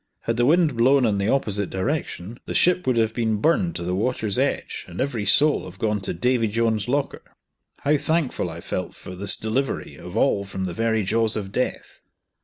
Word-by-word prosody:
Had 115 0 -2
the 120 +1 +3
wind 160 -3 +3
blown 130 +3 +4
in 105 -3 +1
the 100 +2 0
opposite 105 -7 0
direction 115 - -3
the - - -4
ship 180 -2 +3
would 125 -2 +2
have 110 -1 +2
been 110 -2 0
burned 170 - +1
to - - -4
the 90 +1 -2
water's 110 0 0
edge, - - -1
and 90 -1 -9
every 120 -7 -1
soul 145 +9 +4
have 90 - -10
gone 105 0 0
to 95 - -3
"Davy 120 +5 +1
Jones' 110 0 0
locker". 140 +3 -1 0.6
How 150 +1 +3
thankful 150 - -1
I 85 +1 -8
felt - - -4
for 90 - -9
this 100 +3 +3
delivery 125 +5 -2
of 90 +4 -7
all 105 -5 +2
from 95 -1 -4
the 90 - -4
very 110 +1 +1
jaws 110 +2 +1
or 105 - -2
death. 100 +6 -4
115 Hz, 205 wpm, -23 LUFS, 100-135 Hz, 0.6 s, blown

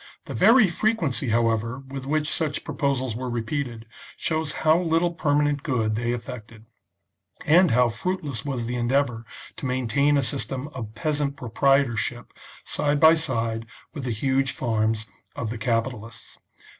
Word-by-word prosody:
The - - -6
very 230 -2 +6
frequency, 165 - 0
however, 115 +1 +1
with 135 0 -7
which 150 +1 0
such 155 -2 -2
proposals 130 -4 -1
were 125 +1 -4
repeated, 120 0 -3 0.3
shows 160 -2 -1
how 155 +2 +6
little 170 0 +2
permanent 145 -3 +1
good 115 -7 0
they 120 +2 -1
effected, 115 -2 -7 0.8
and 175 +3 +6
how 125 +1 +4
fruitless 140 - -3
was 130 -5 -3
the 120 +1 -3
endeavour 120 -1 0 0.3
to - - -6
main 125 -1 -1
tain 145 +5 +3
a 140 - +2
system 135 +1 -3
of 115 -7 -8
peasant 145 +1 -1
proprietorship 125 -1 +1 0.3
side 145 0 0
by 160 +1 +8
side 115 -8 -1 0.3
with 145 - -6
the 125 - -2
huge 135 +4 0
farms 110 -2 0 0.3
of 110 -2 -3
the 115 - -5
capitalists. 115 -1 -3
130 Hz, 145 wpm, -25 LUFS, 115-145 Hz, 0.8 s, by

